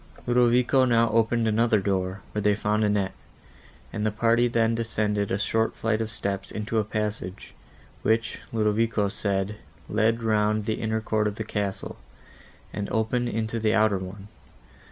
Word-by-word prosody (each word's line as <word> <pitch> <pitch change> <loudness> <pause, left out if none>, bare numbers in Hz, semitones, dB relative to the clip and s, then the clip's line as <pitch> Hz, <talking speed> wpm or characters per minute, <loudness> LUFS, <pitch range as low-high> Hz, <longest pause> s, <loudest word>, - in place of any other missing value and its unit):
Ludovico 125 +2 +4
now 115 -2 +3
opened 115 +1 +2
another 110 0 +3
door, 95 0 -1
where 105 - -2
they 105 0 +3
found 105 +1 0
Annette, 100 -2 +1 0.8
and 105 - -2
the 110 - +2
party 115 +3 +2
then 115 -1 +2
descended 105 -3 -1
a 95 - 0
short 110 +2 0
flight 110 0 0
of 110 - -2
steps 100 -3 -4
into 110 +1 -2
a - - +2
passage, 105 -3 -4 0.5
which, 115 +1 0
Ludovico 110 -1 +1
said, 100 0 -2 0.3
led 115 +1 +1
round 110 -1 +1
the 110 - -2
inner 110 -1 -1
court 110 -1 0
of 105 - -3
the 110 - -4
castle, 100 -2 -3 0.8
and 100 -1 -3
opened 120 +2 0
into 110 +1 -2
the 110 0 +2
outer 105 -3 +3
one. 95 +2 -8
110 Hz, 155 wpm, -26 LUFS, 105-115 Hz, 0.8 s, Ludovico